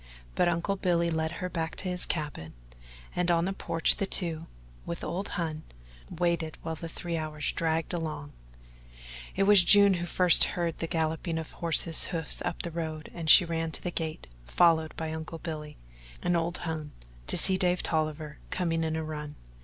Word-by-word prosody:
But -, -, +2 dB
Uncle 175 Hz, +4 st, -1 dB
Billy 170 Hz, -2 st, +1 dB
led 160 Hz, 0 st, -1 dB
her 180 Hz, +2 st, -4 dB
back 165 Hz, -3 st, -4 dB
to 185 Hz, -, -6 dB
his 180 Hz, 0 st, -1 dB
cabin, 145 Hz, -, -4 dB, 0.6 s
and 180 Hz, 0 st, 0 dB
on 170 Hz, 0 st, +2 dB
the 195 Hz, -, -2 dB
porch 165 Hz, -3 st, +3 dB
the 195 Hz, -, -2 dB
two, 165 Hz, -4 st, +1 dB, 0.4 s
with 170 Hz, -, -6 dB
old 190 Hz, +4 st, -3 dB
Hon, 160 Hz, -3 st, -3 dB, 0.5 s
waited 170 Hz, -2 st, -1 dB
while 160 Hz, -, -3 dB
the 165 Hz, +1 st, -7 dB
three 170 Hz, +1 st, -4 dB
hours 155 Hz, -1 st, -3 dB
dragged 165 Hz, +1 st, -1 dB
along. 155 Hz, -, -5 dB, 1.0 s
It 195 Hz, -, +2 dB
was 200 Hz, -2 st, +7 dB
June 200 Hz, +2 st, +8 dB
who 175 Hz, -, -2 dB
was -, -, -9 dB
first 180 Hz, -2 st, +6 dB
to -, -, +5 dB
hear 170 Hz, -1 st, 0 dB
the 165 Hz, 0 st, -5 dB
galloping 160 Hz, +1 st, -2 dB
of 160 Hz, -1 st, -6 dB
horses' 165 Hz, -1 st, 0 dB
hoofs 165 Hz, -4 st, 0 dB
up -, -, -3 dB
the 170 Hz, -, -5 dB
road 160 Hz, -2 st, -5 dB
and 165 Hz, -2 st, -3 dB
she 175 Hz, -, +9 dB
ran 165 Hz, -1 st, -2 dB
to -, -, -4 dB
the 180 Hz, -, -3 dB
gate, 160 Hz, -2 st, -5 dB, 0.2 s
followed 160 Hz, -, +3 dB
by 160 Hz, -1 st, -4 dB
Uncle 160 Hz, +1 st, -6 dB
Billy 155 Hz, -2 st, -7 dB, 0.5 s
and 175 Hz, 0 st, +1 dB
old 170 Hz, +1 st, -1 dB
Hon 155 Hz, -2 st, -4 dB, 0.4 s
to -, -, -1 dB
see 190 Hz, -, +5 dB
young 185 Hz, -, 0 dB
Dave 180 Hz, 0 st, +1 dB
Tolliver 155 Hz, -1 st, -2 dB
coming 165 Hz, -3 st, -1 dB
in 160 Hz, 0 st, -1 dB
a 160 Hz, -, -2 dB
run. 150 Hz, -1 st, -6 dB
165 Hz, 195 wpm, -28 LUFS, 160-175 Hz, 1.0 s, she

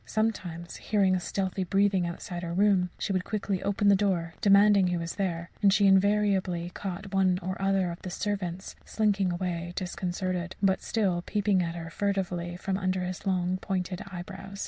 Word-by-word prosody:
Sometimes, 180 Hz, -6 st, -2 dB
hearing 200 Hz, -3 st, +2 dB
a -, -, 0 dB
stealthy 190 Hz, +1 st, -2 dB
breathing 195 Hz, -1 st, +2 dB
outside 175 Hz, +1 st, -5 dB
her 170 Hz, -1 st, -4 dB
room, 195 Hz, -2 st, +3 dB
she 200 Hz, -, -2 dB
would 185 Hz, -1 st, 0 dB
quickly 200 Hz, -2 st, -2 dB
open 200 Hz, +1 st, 0 dB
the 200 Hz, -, +7 dB
door, 185 Hz, -5 st, 0 dB
demanding 200 Hz, -1 st, +6 dB
who 180 Hz, 0 st, 0 dB
was 165 Hz, 0 st, -4 dB
there; 170 Hz, -3 st, -3 dB
and 200 Hz, -2 st, +5 dB
she 200 Hz, +1 st, +4 dB
invariably 195 Hz, -3 st, +3 dB
caught 195 Hz, +1 st, -6 dB
one 190 Hz, -2 st, +3 dB
or 185 Hz, +1 st, -2 dB
other 195 Hz, -2 st, +1 dB
of 170 Hz, -, -9 dB
the 185 Hz, -, -6 dB
servants 190 Hz, -1 st, -3 dB
slinking 200 Hz, -4 st, +1 dB
away 175 Hz, -1 st, -3 dB
disconcerted, 180 Hz, 0 st, -3 dB
but 190 Hz, -1 st, +2 dB
still 190 Hz, -6 st, 0 dB
peeping 205 Hz, 0 st, +1 dB
at 170 Hz, -1 st, -2 dB
her 165 Hz, -1 st, -6 dB
furtively 180 Hz, -3 st, -2 dB
from 190 Hz, +1 st, -2 dB
under 185 Hz, -1 st, 0 dB
his 180 Hz, +2 st, -5 dB
long 185 Hz, -1 st, +1 dB
pointed 185 Hz, -1 st, -3 dB
eyebrows. 195 Hz, +2 st, -8 dB
190 Hz, 175 wpm, -28 LUFS, 175-200 Hz, -, the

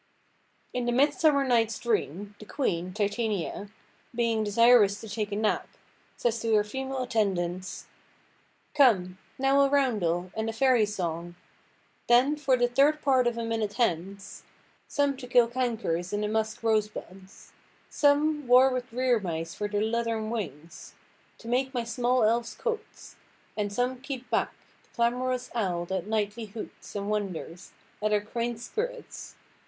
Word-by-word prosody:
In 250 Hz, -1 st, -1 dB
The -, -, +2 dB
Midsummer 285 Hz, +2 st, +3 dB
Night's 230 Hz, -3 st, +2 dB
Dream, 205 Hz, -3 st, -2 dB
the 215 Hz, -, -10 dB
queen, 185 Hz, -, -2 dB
Titania, 205 Hz, -1 st, -2 dB, 0.5 s
being 230 Hz, -2 st, +1 dB
desirous 210 Hz, -1 st, +5 dB
to 225 Hz, -, -9 dB
take 210 Hz, 0 st, -3 dB
a -, -, -1 dB
nap, 215 Hz, 0 st, 0 dB, 0.5 s
says 235 Hz, -1 st, 0 dB
to 225 Hz, -1 st, +2 dB
her 210 Hz, -, +4 dB
female 265 Hz, +4 st, -4 dB
attendants— 185 Hz, -6 st, -2 dB, 0.9 s
"Come, 190 Hz, -11 st, +3 dB, 0.2 s
now 270 Hz, +1 st, +3 dB
a 275 Hz, -, +4 dB
roundel, 195 Hz, -11 st, +1 dB
and 220 Hz, 0 st, -2 dB
a -, -, -3 dB
fairy 245 Hz, -2 st, +3 dB
song; 175 Hz, -4 st, -4 dB, 0.7 s
Then, 255 Hz, +5 st, +5 dB
for 275 Hz, -3 st, +2 dB
the 245 Hz, 0 st, +3 dB
third 280 Hz, +5 st, +3 dB
part 260 Hz, -3 st, +3 dB
of 240 Hz, -1 st, -1 dB
a 230 Hz, -, -2 dB
minute 225 Hz, -2 st, -2 dB
hence; 195 Hz, -4 st, -2 dB, 0.5 s
Some 285 Hz, -1 st, +1 dB
to 255 Hz, -2 st, -8 dB
kill 245 Hz, -1 st, +5 dB
cankers 230 Hz, -8 st, -2 dB
in 205 Hz, -, -1 dB
the 210 Hz, -, 0 dB
musk–rosebuds; 215 Hz, -3 st, -2 dB, 0.4 s
Some, 295 Hz, 0 st, +2 dB
war 255 Hz, +2 st, +7 dB
with 255 Hz, -1 st, -4 dB
rear–mice 200 Hz, -10 st, 0 dB
for 210 Hz, -, -3 dB
their 205 Hz, 0 st, -1 dB
leathern 225 Hz, -1 st, -1 dB
wings, 165 Hz, -, -6 dB, 0.4 s
To 230 Hz, -, -13 dB
make 260 Hz, +2 st, 0 dB
my 240 Hz, -, 0 dB
small 245 Hz, +2 st, +1 dB
elves 230 Hz, +2 st, +1 dB
coats; 470 Hz, -2 st, -5 dB, 0.4 s
and 205 Hz, -1 st, -2 dB
some 245 Hz, +4 st, -1 dB
keep 265 Hz, -2 st, -7 dB
back -, -, +1 dB, 0.3 s
The -, -, -32 dB
clamorous 250 Hz, +1 st, 0 dB
owl 180 Hz, -7 st, -1 dB
that 190 Hz, +1 st, -3 dB
nightly 215 Hz, +1 st, -1 dB
hoots, 210 Hz, 0 st, -10 dB
and 200 Hz, 0 st, -3 dB
wonders 190 Hz, -4 st, -4 dB, 0.3 s
At 215 Hz, 0 st, +1 dB
our 210 Hz, -1 st, +3 dB
quaint 235 Hz, +2 st, -3 dB
spirits. 480 Hz, -, -5 dB
230 Hz, 150 wpm, -28 LUFS, 205-255 Hz, 0.9 s, war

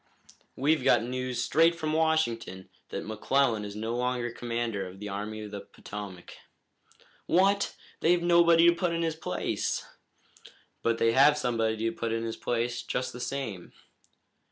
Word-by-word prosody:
"We've 145 Hz, +1 st, +2 dB
got 130 Hz, -4 st, +4 dB
news 125 Hz, 0 st, -2 dB
straight 165 Hz, +2 st, +4 dB
from 155 Hz, -2 st, -2 dB
Washington 120 Hz, -, 0 dB, 0.2 s
that 100 Hz, -, -5 dB
McClellan 110 Hz, +1 st, +1 dB
is 100 Hz, 0 st, -7 dB
no 110 Hz, +2 st, -3 dB
longer 125 Hz, -1 st, -1 dB
commander 115 Hz, -5 st, -3 dB
of 90 Hz, +1 st, -11 dB
the 105 Hz, 0 st, -6 dB
Army 105 Hz, +2 st, -5 dB
of 105 Hz, -, -8 dB
the 100 Hz, -1 st, -6 dB
Potomac." 100 Hz, -4 st, -9 dB, 0.9 s
"What! 195 Hz, +3 st, +3 dB, 0.2 s
They've 170 Hz, +1 st, +3 dB
nobody 170 Hz, -1 st, +6 dB
to 170 Hz, -, +7 dB
put 170 Hz, 0 st, -1 dB
in 165 Hz, 0 st, -1 dB
his 160 Hz, -1 st, -1 dB
place." 90 Hz, -, -2 dB, 1.0 s
"But 115 Hz, 0 st, +1 dB
they 115 Hz, 0 st, +3 dB
have 140 Hz, +5 st, +6 dB
put 150 Hz, -, -3 dB
somebody 115 Hz, -3 st, 0 dB
in 115 Hz, 0 st, -2 dB
his 115 Hz, -1 st, -3 dB
place, 120 Hz, 0 st, -2 dB
just 125 Hz, 0 st, -3 dB
the 125 Hz, -, -8 dB
same." 120 Hz, -9 st, -5 dB
120 Hz, 155 wpm, -28 LUFS, 110-155 Hz, 1.0 s, to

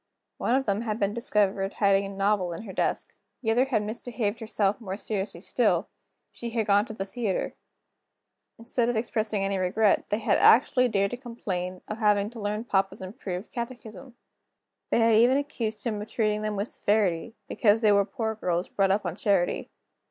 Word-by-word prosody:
One 245 Hz, -, +1 dB
of 270 Hz, 0 st, +1 dB
them 205 Hz, +1 st, 0 dB
had 220 Hz, -1 st, -3 dB
been 200 Hz, 0 st, +1 dB
discovered 205 Hz, -4 st, +1 dB
hiding 200 Hz, -1 st, +3 dB
a -, -, -7 dB
novel 195 Hz, -2 st, 0 dB
in 165 Hz, -, -7 dB
her 195 Hz, -4 st, -8 dB
desk. -, -, -1 dB, 0.3 s
The 225 Hz, -, +2 dB
other 245 Hz, +4 st, +3 dB
had 235 Hz, -6 st, 0 dB
misbehaved 220 Hz, 0 st, -3 dB
herself 215 Hz, -1 st, 0 dB
more 195 Hz, -3 st, -5 dB
seriously 195 Hz, -5 st, -4 dB
still 205 Hz, -4 st, +1 dB, 0.4 s
she 235 Hz, -, -6 dB
had 225 Hz, -1 st, -1 dB
gone 205 Hz, +1 st, +4 dB
to 220 Hz, -, -8 dB
the 195 Hz, -, -3 dB
theater. 200 Hz, -1 st, -2 dB, 1.0 s
Instead 235 Hz, +1 st, -1 dB
of 245 Hz, -, 0 dB
expressing 220 Hz, -2 st, -1 dB
any 195 Hz, -1 st, -1 dB
regret, 195 Hz, +3 st, +2 dB
they 210 Hz, -, +1 dB
had 215 Hz, -2 st, +1 dB
actually 250 Hz, +1 st, +5 dB
dared 200 Hz, -3 st, +1 dB
to 245 Hz, -, -4 dB
complain 185 Hz, -7 st, -5 dB
of 215 Hz, +1 st, -5 dB
having 210 Hz, -1 st, +2 dB
to 235 Hz, -2 st, -9 dB
learn 210 Hz, +2 st, -2 dB
papa's 195 Hz, -3 st, 0 dB
improved 185 Hz, -1 st, -6 dB
catechism. 240 Hz, 0 st, -7 dB, 0.7 s
They -, -, +2 dB
had 225 Hz, 0 st, +4 dB
even 240 Hz, +5 st, +5 dB
accused 235 Hz, -6 st, -3 dB
him 215 Hz, -4 st, -2 dB
of 210 Hz, -, -8 dB
treating 215 Hz, -3 st, 0 dB
them 215 Hz, -1 st, -2 dB
with 205 Hz, +3 st, -2 dB
severity, 205 Hz, 0 st, 0 dB
because 220 Hz, -1 st, +3 dB
they 215 Hz, -2 st, +5 dB
were 200 Hz, 0 st, +5 dB
poor 220 Hz, +1 st, -3 dB
girls 180 Hz, -4 st, -2 dB
brought 195 Hz, -1 st, +1 dB
up 195 Hz, +1 st, +1 dB
on 175 Hz, -1 st, -2 dB
charity. 195 Hz, -3 st, 0 dB
210 Hz, 190 wpm, -27 LUFS, 195-230 Hz, 1.0 s, actually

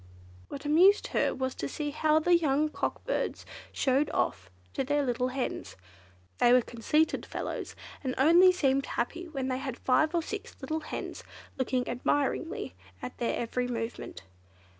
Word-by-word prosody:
What 280 Hz, -, -7 dB
amused 360 Hz, +8 st, +5 dB
her -, -, +1 dB
was 260 Hz, -1 st, -2 dB
to 140 Hz, -, -4 dB
see 295 Hz, -, -3 dB
how 305 Hz, +1 st, +2 dB
the 345 Hz, +3 st, +4 dB
young 305 Hz, -2 st, +2 dB
cock -, -, -3 dB
birds -, -, -2 dB, 0.3 s
showed 275 Hz, +2 st, +1 dB
off 95 Hz, -1 st, -1 dB, 0.2 s
to -, -, -1 dB
the 290 Hz, +2 st, +1 dB
little 250 Hz, -1 st, 0 dB
hens. 255 Hz, 0 st, -4 dB, 0.6 s
They 240 Hz, -, +5 dB
were 250 Hz, -1 st, +5 dB
conceited 300 Hz, +8 st, +1 dB
fellows, -, -, -5 dB, 0.3 s
and 255 Hz, -2 st, -2 dB
only 340 Hz, +7 st, +7 dB
seemed 275 Hz, -6 st, +1 dB
happy 340 Hz, +9 st, -3 dB
when 270 Hz, -5 st, -3 dB
they 255 Hz, 0 st, -1 dB
had 265 Hz, -3 st, -5 dB
five 310 Hz, +6 st, +2 dB
or 335 Hz, -, +1 dB
six 410 Hz, +4 st, -6 dB
little 315 Hz, 0 st, -2 dB
hens -, -, -6 dB, 0.3 s
looking 255 Hz, -1 st, -1 dB
admiringly 280 Hz, -, -1 dB, 0.3 s
at 125 Hz, -, -8 dB
their 235 Hz, -, 0 dB
every 245 Hz, +1 st, -1 dB
movement. 230 Hz, -, -5 dB
275 Hz, 160 wpm, -29 LUFS, 250-315 Hz, 0.6 s, only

